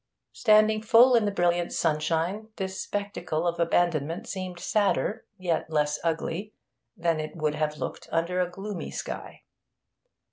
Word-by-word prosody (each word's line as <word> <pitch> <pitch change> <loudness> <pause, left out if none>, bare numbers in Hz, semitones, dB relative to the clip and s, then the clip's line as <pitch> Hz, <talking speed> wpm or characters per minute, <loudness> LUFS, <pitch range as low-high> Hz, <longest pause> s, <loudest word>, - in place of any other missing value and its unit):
Standing 215 -1 +4
full 230 +3 +6
in 230 -3 +4
the 205 - +1
brilliant 175 -2 +1
sunshine, 165 +6 0
this 190 -1 -4
spectacle 200 -5 -3
of 170 0 -1
abandonment 170 -2 +1
seemed 185 -2 -5
sadder, 210 +3 0
yet 175 -4 -1
less 150 -1 +1
ugly, 170 +5 -2 0.4
than 170 -2 +1
it 155 +2 -5
would 155 -2 0
have 150 0 -1
looked - - -6
under 170 +2 +1
a 180 - 0
gloomy 195 0 -6
sky. - - -6
175 Hz, 140 wpm, -27 LUFS, 165-205 Hz, 0.4 s, full